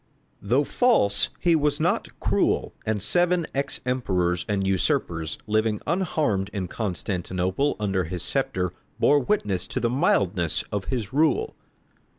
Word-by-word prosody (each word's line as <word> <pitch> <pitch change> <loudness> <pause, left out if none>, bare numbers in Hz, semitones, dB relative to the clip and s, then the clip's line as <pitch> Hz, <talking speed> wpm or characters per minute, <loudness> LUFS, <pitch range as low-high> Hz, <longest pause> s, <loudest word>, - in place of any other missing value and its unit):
Though 125 +8 +2
false, 145 - +3
he 170 -2 +3
was 150 -2 +1
not - - -1
cruel, - - +1
and 110 -1 +1
seven 175 - +2
ex 140 0 -2
emperors 90 -9 0
and 100 -2 0
usurpers, 85 -4 0
living 110 0 +1
unharmed 150 - 0
in 95 -3 -3
Constantinople 95 - -1
under 95 -4 0
his 90 +1 -4
sceptre, 90 -1 -1 0.3
bore 145 - +5
witness 105 - -1
to - - -3
the 115 - 0
mildness 100 - +1
of 100 -2 -2
his 120 -4 -3
rule. 160 - +2
105 Hz, 135 wpm, -25 LUFS, 95-145 Hz, 0.3 s, bore